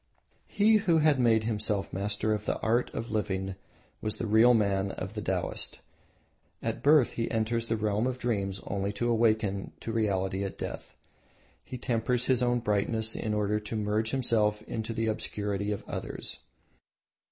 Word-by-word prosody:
He 215 Hz, +2 st, +4 dB
who 185 Hz, -6 st, +2 dB
had 150 Hz, -3 st, +4 dB
made 115 Hz, -3 st, +4 dB
himself 105 Hz, -2 st, -1 dB
master 105 Hz, +2 st, 0 dB
of 105 Hz, 0 st, -3 dB
the -, -, 0 dB
art 120 Hz, +3 st, +1 dB
of 115 Hz, -, -5 dB
living 95 Hz, -3 st, -1 dB, 0.5 s
was 110 Hz, -, -1 dB
the -, -, -3 dB
Real 115 Hz, +3 st, +6 dB
man 100 Hz, -2 st, +1 dB
of 95 Hz, +1 st, -6 dB
the 105 Hz, -, -4 dB
Taoist. 95 Hz, -2 st, -2 dB, 0.8 s
At -, -, -3 dB
birth 145 Hz, -3 st, +5 dB
he 115 Hz, -, -2 dB
enters 115 Hz, +1 st, 0 dB
the 115 Hz, -, 0 dB
realm 105 Hz, +2 st, 0 dB
of 130 Hz, -1 st, -2 dB
dreams 100 Hz, -6 st, -1 dB
only 100 Hz, 0 st, -2 dB
to 120 Hz, +4 st, -1 dB
awaken 110 Hz, -4 st, +1 dB
to 115 Hz, -, -4 dB
reality 95 Hz, -3 st, 0 dB
at 100 Hz, -, -5 dB
death. -, -, -6 dB, 0.7 s
He 130 Hz, -, -7 dB
tempers 120 Hz, +1 st, 0 dB
his 130 Hz, -2 st, +3 dB
own 120 Hz, -1 st, +2 dB
brightness 110 Hz, +1 st, +1 dB
in 105 Hz, -1 st, -2 dB
order 105 Hz, 0 st, +1 dB
to 105 Hz, +2 st, -6 dB
merge 105 Hz, +1 st, 0 dB
himself 110 Hz, -5 st, +1 dB
into 110 Hz, 0 st, -4 dB
the 115 Hz, 0 st, -1 dB
obscurity 105 Hz, -2 st, -2 dB
of 105 Hz, -, -5 dB
others. -, -, -5 dB
110 Hz, 165 wpm, -29 LUFS, 100-115 Hz, 0.8 s, Real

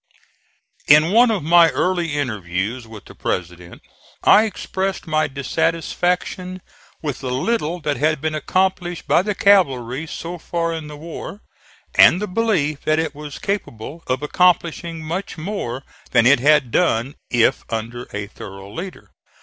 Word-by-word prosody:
In 155 Hz, +3 st, +6 dB
one 235 Hz, +3 st, +6 dB
of 210 Hz, -8 st, -1 dB
my 170 Hz, +1 st, +6 dB
early 175 Hz, -4 st, 0 dB
interviews 110 Hz, -2 st, -3 dB
with 110 Hz, -2 st, -11 dB
the -, -, -13 dB
President 90 Hz, -1 st, -5 dB, 0.4 s
I 215 Hz, -, +6 dB
expressed 195 Hz, -2 st, -3 dB
my 155 Hz, -1 st, +1 dB
dissatisfaction 175 Hz, +6 st, -1 dB, 0.4 s
with 145 Hz, -4 st, -3 dB
the 130 Hz, -, -4 dB
little 170 Hz, -, -1 dB
that 150 Hz, -1 st, -1 dB
had 155 Hz, +1 st, +1 dB
been 155 Hz, +2 st, -2 dB
accomplished 175 Hz, +2 st, -1 dB
by -, -, +4 dB
the 205 Hz, +1 st, -2 dB
cavalry 140 Hz, -9 st, +2 dB
so 170 Hz, +3 st, -6 dB
far 170 Hz, 0 st, -2 dB
in 160 Hz, -2 st, -5 dB
the 150 Hz, 0 st, -9 dB
war, 170 Hz, +6 st, -8 dB, 0.5 s
and 180 Hz, -, +7 dB
the 210 Hz, -, -3 dB
belief 180 Hz, -9 st, 0 dB
that 155 Hz, 0 st, +1 dB
it 160 Hz, -2 st, -1 dB
was 150 Hz, -1 st, -8 dB
capable 165 Hz, -, -4 dB
of 130 Hz, +2 st, -1 dB
accomplishing 170 Hz, 0 st, +1 dB
much 175 Hz, +5 st, -4 dB
more 155 Hz, -, -4 dB, 0.3 s
than 115 Hz, -2 st, +4 dB
it 130 Hz, +1 st, +6 dB
had 145 Hz, -2 st, +3 dB
done 135 Hz, -5 st, +1 dB, 0.2 s
if 120 Hz, -1 st, +2 dB
under 115 Hz, +2 st, -4 dB
a 105 Hz, -1 st, -4 dB
thorough 100 Hz, -1 st, -11 dB
leader. 180 Hz, -, -8 dB
155 Hz, 150 wpm, -20 LUFS, 130-180 Hz, 0.5 s, and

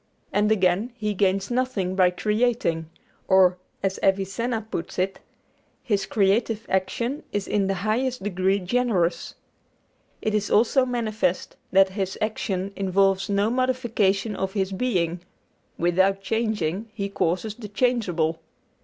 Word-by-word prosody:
And 210 Hz, +1 st, +2 dB
again, 200 Hz, +3 st, +2 dB
he 215 Hz, -3 st, -2 dB
gains 195 Hz, +1 st, +1 dB
nothing 240 Hz, -7 st, -1 dB
by 185 Hz, -2 st, +5 dB
creating, 210 Hz, -4 st, 0 dB, 0.4 s
or, 185 Hz, -1 st, +5 dB, 0.2 s
as 195 Hz, -1 st, -1 dB
Avicenna 195 Hz, +4 st, 0 dB
puts 165 Hz, -, -4 dB
it, 185 Hz, +1 st, -1 dB, 0.6 s
His 205 Hz, -6 st, 0 dB
creative 215 Hz, +2 st, +1 dB
action 235 Hz, +9 st, -1 dB
is 205 Hz, -1 st, -2 dB
in 200 Hz, -2 st, +1 dB
the 195 Hz, -, 0 dB
highest 250 Hz, +1 st, 0 dB
degree 190 Hz, 0 st, +1 dB
generous. 195 Hz, -3 st, 0 dB, 0.8 s
It 215 Hz, -, -1 dB
is 210 Hz, -1 st, 0 dB
also 250 Hz, +4 st, +3 dB
manifest 220 Hz, -6 st, -1 dB, 0.2 s
that 195 Hz, 0 st, +5 dB
His 190 Hz, -1 st, -3 dB
action 200 Hz, -3 st, -2 dB
involves 195 Hz, 0 st, +2 dB
no 200 Hz, +2 st, +2 dB
modification 230 Hz, -5 st, +1 dB
of 190 Hz, 0 st, -3 dB
His 195 Hz, -2 st, -1 dB
being 185 Hz, -6 st, 0 dB, 0.6 s
without 190 Hz, +3 st, +2 dB
changing, 215 Hz, -3 st, -1 dB
He 200 Hz, -2 st, -2 dB
causes 195 Hz, +2 st, -1 dB
the 215 Hz, -1 st, -9 dB
changeable. 195 Hz, -8 st, 0 dB
200 Hz, 125 wpm, -24 LUFS, 190-225 Hz, 0.8 s, by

